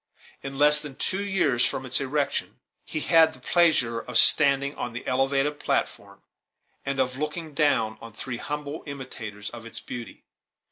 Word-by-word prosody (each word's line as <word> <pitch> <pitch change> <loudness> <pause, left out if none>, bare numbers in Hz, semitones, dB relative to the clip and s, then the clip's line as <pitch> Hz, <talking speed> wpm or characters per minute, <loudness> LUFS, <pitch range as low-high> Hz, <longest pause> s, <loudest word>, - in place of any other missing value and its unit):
In 135 0 -7
less 150 +1 +5
than 150 -3 -9
two 195 +8 -2
years 175 -12 +1
from 130 - -2
its 130 +2 +1
erection, 140 +1 -2 0.2
he 155 - -4
had 160 -1 +4
the - - -15
pleasure 155 -10 +2
of 115 0 0
standing 140 -1 +7
on 125 -5 -6
the 120 - -8
elevated 135 +3 0
platform, - - -3 0.6
and 140 0 -3
of 130 0 -1
looking 150 +1 -5
down 140 -7 0
on 115 - -10
three 115 +3 -7
humble 150 +3 -6
imitators 115 -7 -8
of 120 -1 -10
its 115 - -8
beauty. 120 -1 -9
140 Hz, 160 wpm, -25 LUFS, 125-150 Hz, 0.6 s, standing